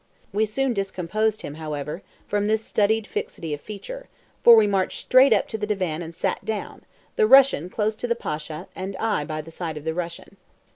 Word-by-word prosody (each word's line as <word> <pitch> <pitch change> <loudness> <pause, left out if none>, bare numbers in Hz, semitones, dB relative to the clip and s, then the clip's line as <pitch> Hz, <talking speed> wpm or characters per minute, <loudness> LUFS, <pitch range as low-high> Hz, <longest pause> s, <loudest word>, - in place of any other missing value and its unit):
We 215 +2 +2
soon 265 +4 0
discomposed 200 +2 -1
him, 145 - -6
however, 150 +2 -4 0.2
from 205 0 0
this 220 +1 +1
studied 220 +1 +1
fixity 165 -4 -4
of 145 - -5
feature, - - -8 0.4
for 235 - +10
we 220 -1 +6
marched 195 -2 0
straight 260 +2 +5
up 215 - +3
to 220 - -4
the 210 - -2
divan 185 -6 -1
and 165 0 -8
sat 180 - -2
down, 215 +1 -4 0.4
the 215 - +4
Russian 265 - +6
close 215 +2 -1
to 245 - -3
the 235 - +1
Pasha, 155 -7 -5
and 190 +1 -5
I 220 -9 0
by 155 0 -4
the 165 +2 -12
side 165 -2 -5
of 150 - -8
the 160 0 -2
Russian. 170 +3 -6
200 Hz, 200 wpm, -24 LUFS, 165-220 Hz, 0.4 s, for